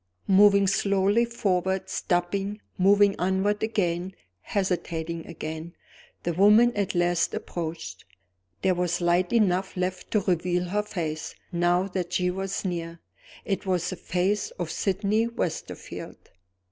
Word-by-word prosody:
Moving 200 Hz, 0 st, +6 dB
slowly 200 Hz, +3 st, +2 dB
forward 190 Hz, -5 st, -1 dB
stopping 195 Hz, +4 st, -1 dB, 0.2 s
moving 200 Hz, +1 st, +4 dB
onward 190 Hz, +3 st, +1 dB
again 190 Hz, -4 st, -1 dB, 0.3 s
hesitating 170 Hz, -, -2 dB
again 160 Hz, 0 st, -6 dB, 0.5 s
the 170 Hz, -, -1 dB
woman 210 Hz, +7 st, +5 dB
at 200 Hz, -3 st, -1 dB
last 175 Hz, -1 st, +1 dB
approached. 160 Hz, -, -5 dB, 0.6 s
There 190 Hz, -, +4 dB
was 175 Hz, -1 st, 0 dB
light 175 Hz, +1 st, +2 dB
enough 190 Hz, -5 st, +1 dB
left 180 Hz, 0 st, -2 dB
to 210 Hz, -, +3 dB
reveal 180 Hz, -1 st, 0 dB
her 205 Hz, +3 st, +1 dB
face, 160 Hz, -7 st, -4 dB, 0.2 s
now 175 Hz, +1 st, +2 dB
that 180 Hz, -2 st, -3 dB
she 180 Hz, 0 st, +1 dB
was 195 Hz, +2 st, -3 dB
near. 170 Hz, -2 st, -4 dB, 0.5 s
It 195 Hz, -1 st, -2 dB
was 180 Hz, -2 st, 0 dB
the -, -, -3 dB
face 190 Hz, -, -1 dB
of -, -, -3 dB
Sydney 205 Hz, +3 st, +1 dB
Westerfield. 230 Hz, -8 st, -6 dB
185 Hz, 125 wpm, -26 LUFS, 175-200 Hz, 0.6 s, Moving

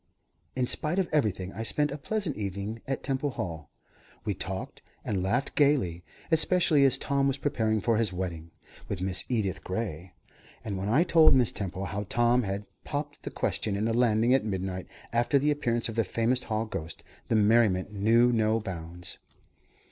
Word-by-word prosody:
In 130 Hz, -1 st, +1 dB
spite 155 Hz, +7 st, 0 dB
of 190 Hz, -2 st, +1 dB
everything, 100 Hz, -10 st, 0 dB
I -, -, -5 dB
spent 145 Hz, +6 st, 0 dB
a -, -, -3 dB
pleasant 195 Hz, -1 st, -2 dB
evening 100 Hz, +2 st, -4 dB
at 135 Hz, -, -3 dB
Temple 135 Hz, +1 st, -1 dB
Hall. 80 Hz, -, -5 dB, 0.6 s
We 105 Hz, -, 0 dB
talked 95 Hz, +1 st, -5 dB, 0.2 s
and 100 Hz, -4 st, -1 dB
laughed 120 Hz, +9 st, 0 dB
gaily, 130 Hz, -, +2 dB, 0.3 s
especially 160 Hz, -2 st, +5 dB
as 135 Hz, -, +4 dB
Tom 140 Hz, -1 st, 0 dB
was 135 Hz, 0 st, 0 dB
preparing 110 Hz, -6 st, 0 dB
for 115 Hz, +1 st, +2 dB
his 110 Hz, -4 st, +1 dB
wedding 85 Hz, -3 st, -5 dB, 0.4 s
with -, -, -3 dB
Miss 95 Hz, 0 st, +1 dB
Edith 100 Hz, -6 st, -1 dB
Gray, 95 Hz, -3 st, -4 dB, 0.5 s
and 100 Hz, -, -3 dB
when 95 Hz, +2 st, -3 dB
I 140 Hz, +9 st, +4 dB
told 165 Hz, -4 st, +6 dB
Mrs. 125 Hz, -4 st, +3 dB
Temple 95 Hz, -1 st, -4 dB
how 100 Hz, +1 st, -4 dB
Tom 120 Hz, +1 st, +3 dB
had 100 Hz, -1 st, -3 dB, 0.2 s
popped 145 Hz, 0 st, -5 dB
the -, -, -5 dB
question 100 Hz, -2 st, -2 dB
on 105 Hz, -, -1 dB
the 115 Hz, -, +1 dB
landing 115 Hz, 0 st, +3 dB
at 135 Hz, -, +3 dB
midnight, 95 Hz, -3 st, -3 dB, 0.3 s
after 120 Hz, +4 st, +3 dB
the 145 Hz, +2 st, +2 dB
appearance 120 Hz, -6 st, 0 dB
of 115 Hz, -, -5 dB
the 115 Hz, +1 st, +1 dB
famous 115 Hz, +5 st, 0 dB
hall 110 Hz, 0 st, -1 dB
ghost, 80 Hz, -7 st, -6 dB, 0.2 s
the -, -, +1 dB
merriment 105 Hz, -3 st, +3 dB
knew 115 Hz, +4 st, +4 dB
no 110 Hz, -1 st, +2 dB
bounds. 90 Hz, -4 st, -6 dB
110 Hz, 180 wpm, -28 LUFS, 95-130 Hz, 0.6 s, told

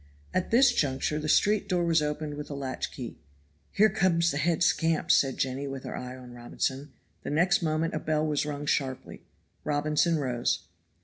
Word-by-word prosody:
At 185 Hz, -, 0 dB
this 260 Hz, +4 st, +5 dB
juncture 140 Hz, +2 st, 0 dB
the 155 Hz, 0 st, -3 dB
street 210 Hz, +6 st, +3 dB
door 180 Hz, -1 st, +1 dB
was 165 Hz, -2 st, +3 dB
opened 150 Hz, 0 st, -3 dB
with 145 Hz, 0 st, -7 dB
a 145 Hz, -, -5 dB
latch 135 Hz, -2 st, -4 dB
key. 120 Hz, -, -8 dB, 0.5 s
"Here 215 Hz, +2 st, +5 dB
comes 170 Hz, -4 st, +2 dB
the 140 Hz, -, -3 dB
head 165 Hz, +3 st, +1 dB
scamp,' 165 Hz, -2 st, +2 dB
said 135 Hz, -2 st, +3 dB
Jenny, 135 Hz, +2 st, -2 dB
with 135 Hz, -1 st, -6 dB
her -, -, -6 dB
eye 125 Hz, 0 st, -6 dB
on 125 Hz, -1 st, -12 dB
Robinson. 130 Hz, +3 st, -3 dB, 0.3 s
The -, -, -6 dB
next 175 Hz, +6 st, +2 dB
moment 160 Hz, 0 st, 0 dB
a 155 Hz, -, -1 dB
bell 155 Hz, 0 st, 0 dB
was 150 Hz, -2 st, 0 dB
rung 145 Hz, -1 st, -4 dB
sharply. 135 Hz, -3 st, -2 dB, 0.4 s
Robinson 150 Hz, +3 st, +1 dB
rose. 125 Hz, -4 st, -1 dB
150 Hz, 185 wpm, -28 LUFS, 135-165 Hz, 0.5 s, this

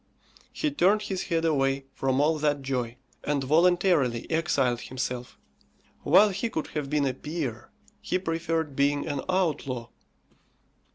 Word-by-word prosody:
He 305 Hz, -, -1 dB
turned 210 Hz, -5 st, +3 dB
his 190 Hz, -3 st, -3 dB
head 165 Hz, -1 st, 0 dB
away 135 Hz, -3 st, +1 dB
from 130 Hz, 0 st, 0 dB
all 155 Hz, +2 st, +2 dB
that 145 Hz, -2 st, 0 dB
joy, 125 Hz, -3 st, -2 dB, 0.3 s
and 145 Hz, -2 st, 0 dB
voluntarily 160 Hz, -5 st, +3 dB
exiled 135 Hz, -7 st, +1 dB
himself. 125 Hz, -1 st, -5 dB, 0.6 s
While 190 Hz, +8 st, +6 dB
he 205 Hz, +4 st, -2 dB
could 160 Hz, -, -3 dB
have 150 Hz, -3 st, -4 dB
been 150 Hz, -1 st, +1 dB
a 130 Hz, -, 0 dB
peer, 135 Hz, -5 st, -5 dB, 0.3 s
he -, -, 0 dB
preferred 165 Hz, -4 st, -2 dB
being 145 Hz, +1 st, +1 dB
an 140 Hz, -2 st, -2 dB
outlaw. 145 Hz, -10 st, -1 dB
150 Hz, 135 wpm, -27 LUFS, 135-170 Hz, 0.6 s, While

